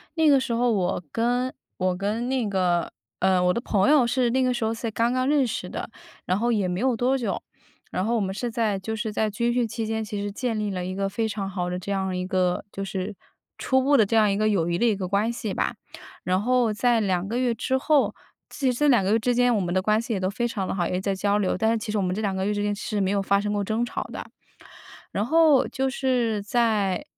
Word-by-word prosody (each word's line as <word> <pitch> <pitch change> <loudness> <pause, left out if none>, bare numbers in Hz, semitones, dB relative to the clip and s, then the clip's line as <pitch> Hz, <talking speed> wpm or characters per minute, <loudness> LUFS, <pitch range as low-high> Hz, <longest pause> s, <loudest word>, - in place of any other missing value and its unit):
那 320 -1 +3
个 280 -2 +6
时 260 -3 -2
候 240 +1 +2
我 185 -3 0
跟 245 +2 0 0.2
我 185 -1 0
跟 210 +6 -2
那 255 -5 0
个， 180 -3 0 0.3
呃， 185 -1 +3
我 180 - +3
的 235 - -1
朋 200 +2 +2
友 290 -5 +5
是 245 -1 +1
那 260 +2 +2
个 255 -1 +2
时 240 -2 -3
候 220 +1 0
才 230 0 -4
刚 230 +2 +1
刚 255 +1 0
认 285 -3 +3
识 225 - -4
的， - - -5 0.4
然 185 - +1
后 240 +1 +1
也 205 -5 +1
没 180 +1 -2
有 255 -1 +2
多 255 +4 +1
久， 245 - -2 0.5
然 185 - -1
后 235 - +1
我 225 - +1
们 190 -1 -2
是 240 +4 -3
在 220 -4 0
就 220 +4 -4
是 220 0 -3
在 215 0 +1
军 235 +3 0
训 245 -1 +1
期 225 +1 -4
间 220 0 -2
其 210 -1 -4
实 205 0 -3
建 230 +1 -2
立 210 -1 -2
了 180 -2 -3
一 185 +1 -4
个 195 0 -1
非 220 +3 -1
常 200 -2 -4
好 180 -2 -3
的 180 - -3
这 195 +2 -5
样 190 -1 -1
一 180 0 -2
个 185 -1 0
就 195 - -5
是 195 +1 -4 0.4
初 260 0 +2
步 285 +2 +4
的 220 - +5
这 225 - -1
样 215 -2 +4
一 195 - 0
个 215 +1 +2
友 175 -5 +1
谊 170 - 0
的 235 - +1
一 225 -3 +3
个 190 -2 -4
关 205 +4 +1
系 225 -4 -4
吧。 - - -1 0.5
然 185 +2 +1
后 245 -1 +2
在 240 +1 +2
2 185 -2 0
个 230 - -2
月 250 -2 +1
之 260 +3 -1
后 290 +1 +2 0.4
其 270 -3 0
实 240 - -4
这 295 - +3
2 240 -8 +4
个 190 - +1
月 225 - +3
之 245 +2 0
间， 245 -1 +3
我 205 - +1
们 175 -1 -2
的 185 - +3
关 215 +3 +2
系 235 - -6
也 195 - -1
都 185 - 0
非 240 +4 -1
常 195 -5 -3
地 - - -2
好， 175 -3 0
也 180 - -1
在 195 +1 -1
交 200 +2 +1
流， 195 -3 0
但 220 +3 +2
是 230 - +1
其 215 0 -5
实 215 - -1
我 - - 0
们 185 0 -1
这 - - -3
2 200 -3 -1
个 190 - -1
月 210 - 0
之 205 0 -1
间 205 0 0
是 210 +1 -3
没 195 -1 +1
有 200 -1 +1
发 200 0 +2
生 205 +1 -2
过 205 -1 0
争 220 +4 -1
吵 - - -4
的。 - - -7 0.9
然 205 - -1
后 315 -1 +4
就 265 0 -1
是 245 -5 0
在 210 -4 +1
215 Hz, 290 characters per minute, -25 LUFS, 195-240 Hz, 0.9 s, 个